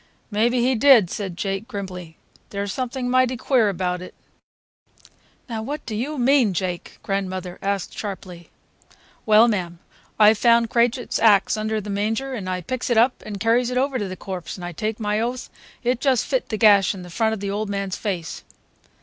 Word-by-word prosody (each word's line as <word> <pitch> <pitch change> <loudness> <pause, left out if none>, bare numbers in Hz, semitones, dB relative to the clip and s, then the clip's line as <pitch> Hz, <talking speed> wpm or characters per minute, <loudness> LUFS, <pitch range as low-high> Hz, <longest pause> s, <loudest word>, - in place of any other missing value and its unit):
"Maybe 235 +4 +2
he 255 +2 +2
did," 235 -6 +5
said 190 -4 -5
Jake 195 +3 -3
grimly. 180 -7 -7 0.3
"There's 200 -1 -3
something 255 0 -3
mighty 255 0 +2
queer 235 -4 +2
about 180 -1 -2
it." 185 - -10 1.3
"Now 225 -3 -4
what 290 +7 -5
do 220 - -4
you 280 +8 -3
mean, 250 -6 +3
Jake?" 180 0 -4
grandmother 185 -2 -3
asked 200 -1 -2
sharply. 185 -4 -7 0.8
"Well, 215 +2 +7
mam, 180 -6 -2 0.4
I 215 0 +8
found 230 +1 +3
Krajiek's 240 +1 +1
axe 205 -3 +4
under 215 0 -1
the 210 0 -6
manger, 225 +7 -1
and 200 -7 -4
I 180 0 -2
picks 255 +9 -4
it 240 - +2
up 245 +3 +3
and 205 -2 -5
carries 235 +3 +2
it 250 - -2
over 265 0 0
to 205 - -2
the 185 - -6
corpse, 185 -3 -6
and 180 - -7
I 175 - -5
take 215 +6 -3
my 210 -1 0
oath 245 +2 -3 0.3
it 245 0 0
just 265 -5 +2
fit - - -1
the 215 - -2
gash 205 -3 +5
in 185 - -8
the 180 - -11
front 220 +4 +1
of - - -9
the 200 0 -3
old 210 +1 -3
man's 195 -2 -2
face. 180 -6 -4
215 Hz, 190 wpm, -22 LUFS, 195-240 Hz, 1.3 s, I